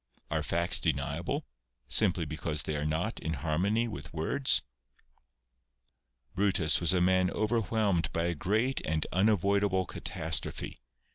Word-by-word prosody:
Are - - 0
facts 85 +1 +3
deniable, 70 -5 -2 0.4
simply 90 -6 +2
because 75 -1 -3
they 75 - -3
are 75 +1 -1
not 85 +9 -2
in 80 - -3
harmony 90 - 0
with 75 -10 -7
words? 130 - +2 1.7
Brutus 90 -5 +2
was 85 - +4
a 90 - +2
man 95 0 +3
overwhelmed 110 -4 0
by 85 - -1
a 85 0 0
great 110 - 0
and 80 0 -1
unavoidable 100 -1 +2
catastrophe. 80 -1 -3
90 Hz, 125 wpm, -30 LUFS, 80-105 Hz, 1.7 s, was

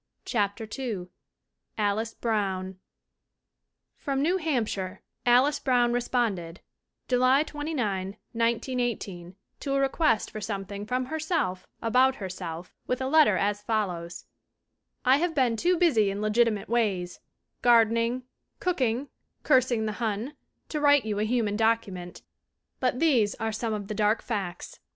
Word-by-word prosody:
CHAPTER 210 -1 -1
II 210 -9 -4 0.7
ALICE 215 +2 0
BROWN 190 -4 -2 1.2
FROM 275 -1 -2
New 350 +5 +2
Hampshire 220 - -2 0.2
Alice 265 +5 +5
Brown 245 -2 +2
responded,, 225 -8 -1 0.5
July 255 +3 +4
29, 230 -12 -3
1918, 230 -6 -2 0.2
to 275 - -2
a - - +2
request 270 -4 +1
for 215 - -6
something 200 0 -5
from 255 +2 0
herself 310 - -2 0.2
about 255 +3 +4
herself 180 -5 -6
with 250 - -1
a 260 - -2
letter 275 -8 +5
as 205 +1 0
follows: 185 -6 -2 0.8
"I 260 +2 +6
have 335 +1 -1
been 250 -5 +2
too 350 +9 +2
busy 245 - +3
in 195 +1 -3
legitimate 215 0 +1
ways 200 -6 0 0.4
garden 230 -2 +5
ing, 235 +2 0 0.4
cooking, 265 -7 0 0.4
cursing 245 -3 +3
the 215 -1 -4
Hun 225 +6 -2 0.3
to 300 - -2
write 285 -4 +5
you 210 -2 -2
a 215 - +1
human 220 -3 0
document. 210 -5 -1 0.6
But 250 -1 +1
these 245 -11 +3
are 225 -1 -2
some 220 0 -2
of 205 -2 -5
the 215 - -3
dark 210 +1 +1
facts. 195 -7 -4
230 Hz, 130 wpm, -27 LUFS, 205-255 Hz, 1.2 s, I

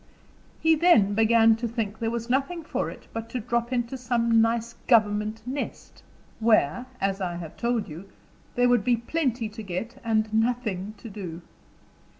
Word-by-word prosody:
He 320 0 +4
began 295 - +5
then 225 +1 +5
to 235 +1 -2
think 220 -2 -3
there 225 -1 0
was 235 0 -3
nothing 275 +7 0
for - - -2
it - - -11
but 225 0 -5
to 250 - -3
drop 235 +2 -1
into 245 +1 -2
some 235 -2 +2
nice 230 +1 0
government 215 -1 +2
nest, 270 +3 -6 0.4
where, 225 - +2
as 195 0 -1
I 175 -2 -2
have 170 -2 -7
told 235 -2 -1
you, 175 +5 -10 0.5
there 245 0 +4
would 245 -4 +3
be 240 +1 +3
plenty 245 -2 -1
to 220 +1 -8
get 220 +7 -5
and 220 -1 0
nothing 220 -3 0
to 200 - -10
do. 185 -5 -7
230 Hz, 165 wpm, -26 LUFS, 210-245 Hz, 0.5 s, began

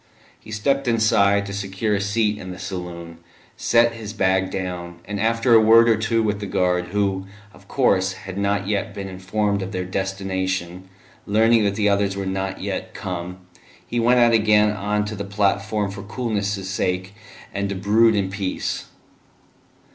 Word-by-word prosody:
He - - -16
stepped 135 +6 0
inside 105 -3 +3
to 100 - -6
secure 100 +2 -2
a 100 - 0
seat 105 +1 0
in 95 - -8
the 90 - -7
saloon, 90 -3 -7 0.4
set 120 0 +3
his 110 -2 -7
bag 95 -2 +1
down, 90 -2 -5
and 105 0 -4
after 115 +2 +2
a 115 - +8
word 115 +1 +6
or 115 - +5
two 110 +1 0
with 105 -1 -1
the 100 - -5
guard, 90 -1 +1
who, 95 0 -1 0.3
of - - -19
course, 95 -1 +2
had 95 0 -9
not 100 0 0
yet 105 0 -2
been 100 -1 -5
informed 100 +2 -1
of 95 +2 -5
their 90 0 -2
destination, 95 -1 -3 0.4
learning 110 +1 +4
that 100 -1 0
the 105 -1 +1
others 100 -1 +1
were 100 - -3
not 95 0 -3
yet - - -4
come, 90 0 -5 0.4
he 120 - -2
went 120 +2 +4
out 120 -1 +5
again 105 -1 +4
on 105 0 -1
to 105 - -5
the 100 - -4
platform 100 +1 0
for 100 +1 -8
coolness' 105 -3 -3
sake, 95 0 -2 0.4
and 100 0 -2
to 100 - -3
brood 110 +4 +3
in 95 -2 0
peace. 95 -1 -3
100 Hz, 175 wpm, -22 LUFS, 95-110 Hz, 0.4 s, a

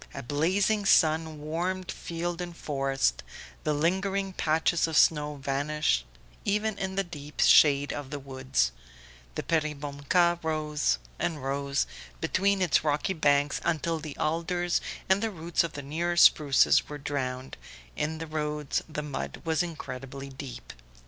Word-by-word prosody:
A 140 - -5
blazing 190 - +1
sun 160 -2 +3
warmed 175 +5 -2
field 170 +1 -4
and 175 -1 -6
forest, 135 -2 0 0.4
the 155 - +1
lingering 190 +5 0
patches 160 +1 +2
of 160 -1 0
snow 150 -2 +4
vanished 140 - 0 0.4
even 210 +1 0
in 190 0 -3
the 195 - +1
deep 150 -4 -10
shade 145 -1 +6
of 145 -2 -6
the 145 - -4
woods; 130 - -1 0.6
the - - -3
Peribonka 155 +2 +1
rose 150 - 0 0.2
and 155 -5 -2
rose 140 +1 0 0.3
between 195 - +1
its 175 - +3
rocky 150 +4 0
banks 145 -3 +2
until 165 0 0
the 150 -2 -8
alders 170 +2 0 0.3
and 190 +1 +3
the 225 - 0
roots 170 -4 0
of 170 - -4
the 140 - -6
nearer 170 +5 -2
spruces 145 -4 +5
were 150 - -5
drowned; 130 -2 -4 0.4
in 160 +1 -2
the 165 - -5
roads 150 -2 -2
the 150 -1 -4
mud 145 -2 -5
was 160 0 +1
incredibly 135 -5 -6
deep. 135 -1 -8
155 Hz, 140 wpm, -28 LUFS, 140-175 Hz, 0.6 s, shade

